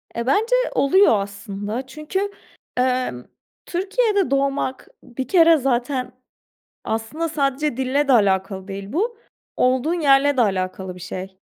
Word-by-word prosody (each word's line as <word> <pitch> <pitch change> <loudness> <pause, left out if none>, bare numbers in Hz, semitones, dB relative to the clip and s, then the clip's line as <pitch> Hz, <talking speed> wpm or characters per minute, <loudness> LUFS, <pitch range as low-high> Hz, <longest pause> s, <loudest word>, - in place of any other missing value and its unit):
E, 235 - -2
bence 445 - +3 0.2
oluyor 280 - +4
aslında. 205 +4 -5
Çünkü, 310 +9 -3 0.5
ımm, 250 - 0 0.4
Türkiye'de 400 - 0
doğmak 275 -1 -1 0.2
bir 255 +1 -6
kere 330 0 +6
zaten 255 -1 -1 0.7
aslında 225 +10 -2
sadece 285 -2 -1
dille 265 +2 0
de - - +5
alakalı 195 -3 +1
değil 195 +1 -7
bu, 440 - -1 0.4
olduğun 260 +6 +2
yerle 280 -1 +4
de - - +2
alakalı 190 -3 -1
bir 180 - -12
şey. 185 +1 -7
260 Hz, 125 wpm, -21 LUFS, 205-305 Hz, 0.7 s, kere